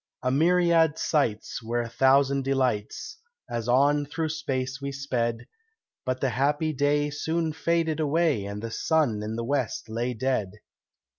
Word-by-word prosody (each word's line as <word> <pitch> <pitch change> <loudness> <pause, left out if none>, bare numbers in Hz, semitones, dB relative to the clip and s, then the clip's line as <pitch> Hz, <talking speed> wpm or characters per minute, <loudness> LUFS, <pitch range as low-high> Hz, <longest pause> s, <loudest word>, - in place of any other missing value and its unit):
A 125 - +1
myriad 165 +1 +3
sights 125 -7 0
were 120 +1 -1
a 120 - -4
thousand 135 +2 +3
delights 135 - -1 0.3
As 115 -1 -4
on 145 +3 +3
through 155 +2 -2
space 135 -4 -3
we 140 0 -3
sped, 125 -4 -2 0.6
But 130 0 -1
the 135 - +2
happy 145 +6 0
day 145 +1 +1
soon 160 +2 -1
faded 160 -1 0
away 155 -7 +1
And 100 +2 -6
the 115 - -4
sun 140 -7 +1
in 110 +1 -4
the 115 0 -3
west 130 -4 -2
lay 120 +2 -2
dead. 110 -5 -1
135 Hz, 150 wpm, -26 LUFS, 120-155 Hz, 0.6 s, myriad